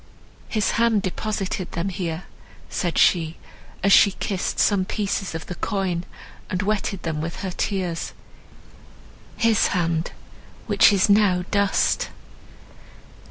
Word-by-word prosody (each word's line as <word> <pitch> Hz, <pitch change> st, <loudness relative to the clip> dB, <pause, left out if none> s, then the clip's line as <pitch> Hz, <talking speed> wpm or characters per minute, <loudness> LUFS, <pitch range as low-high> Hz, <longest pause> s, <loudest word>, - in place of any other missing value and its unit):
"His 215 Hz, -2 st, +1 dB
hand 225 Hz, -4 st, +3 dB
deposited 190 Hz, -1 st, -3 dB
them 170 Hz, +3 st, -2 dB
here," 175 Hz, -2 st, -4 dB, 0.5 s
said 175 Hz, -2 st, -1 dB
she, 165 Hz, -2 st, +3 dB, 0.5 s
as 195 Hz, 0 st, +5 dB
she 200 Hz, -, +7 dB
kissed 195 Hz, -2 st, -3 dB
some 200 Hz, -3 st, +3 dB
pieces 195 Hz, -2 st, -2 dB
of 160 Hz, -, -5 dB
the -, -, -6 dB
coin, 180 Hz, -2 st, -2 dB, 0.4 s
and 185 Hz, +1 st, -1 dB
wetted 200 Hz, -2 st, -1 dB
them 155 Hz, -2 st, -2 dB
with 165 Hz, +2 st, -5 dB
her 190 Hz, -, -3 dB
tears, 180 Hz, -3 st, -2 dB, 1.2 s
"his 225 Hz, -3 st, +3 dB
hand—which 165 Hz, +3 st, 0 dB
is 195 Hz, 0 st, +3 dB
now 200 Hz, -4 st, +3 dB
dust!" 200 Hz, -1 st, +1 dB
190 Hz, 115 wpm, -23 LUFS, 170-200 Hz, 1.2 s, she